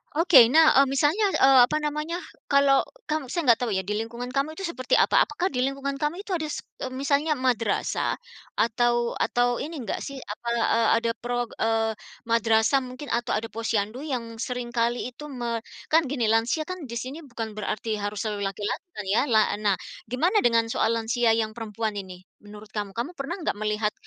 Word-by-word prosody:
Oke 315 -8 +7
nah, 315 +6 +6
eee, 275 - +5
misalnya, 290 +10 +2
eee, 265 -1 +6
apa 305 - 0
namanya, 300 +3 -2 0.3
kalau 280 -1 +5 0.3
kamu 305 -3 -1
saya 335 +6 -2
nggak 230 - +3
tahu 240 -3 -1
ya 190 - 0
di 200 - -5
lingkungan 235 +2 -5
kamu 280 +3 -1
itu 390 - -7
seperti 305 -8 0
apa, - - +4
apakah 345 +5 -2
di 250 - -2
lingkungan 275 +1 -2
kamu 335 +7 -2
itu 400 - -9
ada 320 -4 -1
s 300 - -5 0.2
eee, - - -3
misalnya 285 +3 +1
madrasah? 240 -5 0 0.4
Atau 240 +1 +1
atau 245 0 +1
ini 315 +4 -5
nggak 215 - -3
sih, 275 - -6
apa, 215 +3 -8 0.3
e - - +2 0.2
ada 230 0 +1
pro 245 0 -1 0.2
eee, 225 0 +1 0.3
madrasah 230 +3 +3
mungkin 255 +3 -8
atau 235 -1 0
ada 225 +1 -3
posyandu 225 +1 -2
yang 240 -6 -5
sering 245 0 -4
kali 235 +1 0
itu 295 +5 -10
me 240 -4 -3 0.3
kan 315 -2 +4
gini 240 -5 0
lansia 230 +7 +2
kan 365 +3 -6
di 235 - -7
sini 260 +4 -7
bukan 225 -3 -5
berarti 215 +1 -3
harus 205 +1 -3
selalu 205 -2 -2
laki-laki 205 - -4
kan 210 - -5
ya? - - +4
La 220 -4 +4 0.2
nah 205 -2 +2 0.4
gimana 345 - +2
dengan 230 - +2
soal 230 - +1
lansia 230 0 +2
yang 220 -1 -1
perempuan 220 -1 -3
ini 185 -1 -10 0.2
menurut 210 +1 -12
kamu? 205 -2 -4
Kamu 240 +8 -3
pernah 340 +1 -5
enggak 205 - -1
melihat 210 0 0
240 Hz, 190 wpm, -25 LUFS, 225-280 Hz, 0.4 s, Oke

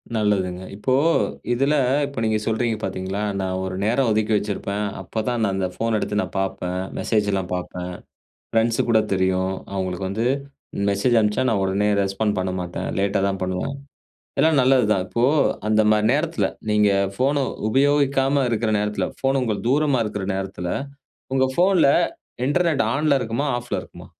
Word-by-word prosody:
நல்லதுங்க, 95 -4 0
இப்போ 130 +6 -1 0.6
இதில, 135 +4 +2 0.3
இப்போ 140 -3 -6
நீங்க 110 -1 +2
சொல்றீங்க 115 0 0
பாத்தீங்களா? 95 +1 -3 0.2
"நான் 95 -1 -2
ஒரு 95 0 -4
நேரம் 120 +5 +2
ஒதுக்கி 110 +1 +1
வச்சிருப்பேன், 100 0 -3 0.2
அப்பதான் 115 +5 -2
நான் 100 -2 +1
அந்த 95 -1 0
ஃபோன் 115 +2 -1
எடுத்து 105 0 -1
நான் - - -6
பாப்பேன், 90 -1 -2 0.2
மெசேஜ்ல்லாம் 100 -4 0
பாப்பேன், 90 0 -5 0.6
ஃப்ரெண்ட்ஸுக்கு 115 +1 +1
கூட 110 - +5
தெரியும், 95 0 +1 0.2
அவுங்களுக்கு 95 -1 -2
வந்து, 110 +5 -1 0.6
மெசேஜ் 115 +4 +2
அனுப்பிச்சா 105 +4 +1
நான் 100 -4 +1
உடனே 100 +2 +1
ரெஸ்பாண்ட் 105 +2 -1
பண்ண 95 0 -1
மாட்டேன், 90 0 -4
லேட்டா 100 0 +1
தான் 95 -1 -3
பண்ணுவேன்." 95 +9 -2 0.7
எல்லாம் 155 -3 +4
நல்லதுதான், 125 -7 +3
இப்போ 115 - -1 0.5
அந்த 110 0 +4
மாரி 105 0 +3
நேரத்தில, 160 +3 0 0.2
நீங்க 105 -1 +4 0.3
ஃபோன 140 +1 +1 0.2
உபயோகிக்காம 140 +1 +2
இருக்க 110 -1 0
நேரத்தில, 105 0 -1
ஃபோன் 135 0 +1
உங்கள் 110 -3 -2
தூரமா 140 -2 +2
இருக்கிற 105 -2 -4
நேரத்தில, 95 -2 -4 0.6
உங்க 130 0 +3
ஃபோன்ல, 180 -4 +4 0.6
Internet 160 +1 +1
ஆன்ல 145 0 +2
இருக்குமா, 120 +3 -2
ஆஃப்ல 120 0 -4
இருக்குமா? - - -13
110 Hz, 145 wpm, -22 LUFS, 95-130 Hz, 0.7 s, கூட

